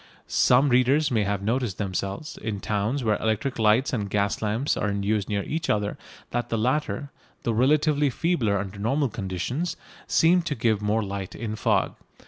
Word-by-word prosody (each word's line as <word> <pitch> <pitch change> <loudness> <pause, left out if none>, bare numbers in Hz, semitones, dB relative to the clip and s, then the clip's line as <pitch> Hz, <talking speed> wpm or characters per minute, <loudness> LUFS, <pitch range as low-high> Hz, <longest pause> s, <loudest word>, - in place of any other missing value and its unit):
Some 130 +3 +4
readers 130 +4 +3
may 110 -4 +2
have 100 -1 -1
noticed 115 -2 -1
themselves, 100 - -3
in 105 -2 -4
towns 110 +7 -1
where 110 -2 +2
electric 110 +4 -1
lights 110 +6 +3
and 105 -5 -1
gas 100 0 0
lamps 110 +6 0
are 105 - -1
in 100 0 -2
use 105 -1 0
near 100 -1 0
each 160 +1 -3
other, 105 -1 0 0.4
that 120 0 -2
the 115 - 0
latter, 140 +4 -1 0.3
though 115 - 0
relatively 145 +4 +3
feebler 125 - +1
under 95 +1 -5
normal 135 +6 +1
conditions, 115 - -3 0.3
seem 175 +2 +4
to 160 -4 -3
give 110 -2 +1
more 105 +2 +1
light 100 -1 -5
in 110 -1 -4
fog. - - +1
110 Hz, 175 wpm, -25 LUFS, 100-135 Hz, 0.4 s, Some